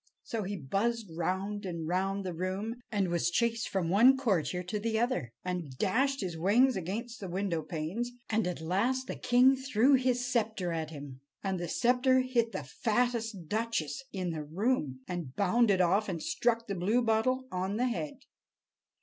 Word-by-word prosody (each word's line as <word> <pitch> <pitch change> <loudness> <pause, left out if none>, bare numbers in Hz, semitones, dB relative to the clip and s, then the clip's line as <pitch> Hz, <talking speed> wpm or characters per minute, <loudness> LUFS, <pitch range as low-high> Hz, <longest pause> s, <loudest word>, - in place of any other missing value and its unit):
So 230 - -3
he 200 0 -3
buzzed 200 - -1
round 190 +5 -2
and 170 -4 -4
round 195 +3 -1
the 180 - -3
room, 195 +7 -3
and 200 -4 +1
was 170 0 +1
chased 230 +5 0
from 190 -4 -1
one 245 +7 +6
courtier 185 - 0
to 195 +4 -3
the 220 +1 -1
other, 220 - 0
and 175 -8 -4
dashed 270 - +1
his 180 -4 -3
wings 220 +10 +4
against 220 +7 -4
the 195 - -6
window 180 -2 -1
panes, 170 +11 -3 0.2
and 220 -4 +1
at 180 -3 -4
last 230 +11 0
the - - -4
king 250 +2 +5
threw 260 0 +3
his 250 -2 +2
scepter 220 -7 0
at 160 -2 -2
him, 140 -4 -9 0.2
and 190 -2 -1
the 175 - -3
scepter 255 +4 +3
hit 240 -3 +1
the - - -4
fattest 225 -5 -1
duchess 225 - -2
in 185 -3 -2
the 155 -2 -4
room, 155 - -1
and 170 -8 -5
bounded 200 0 +3
off 195 +4 +2
and 170 -4 -3
struck 230 -1 +1
the 200 - -3
Bluebottle 225 +6 +1
on 190 +3 -2
the 250 - +2
head. 270 +2 -4
205 Hz, 175 wpm, -31 LUFS, 180-240 Hz, 0.2 s, one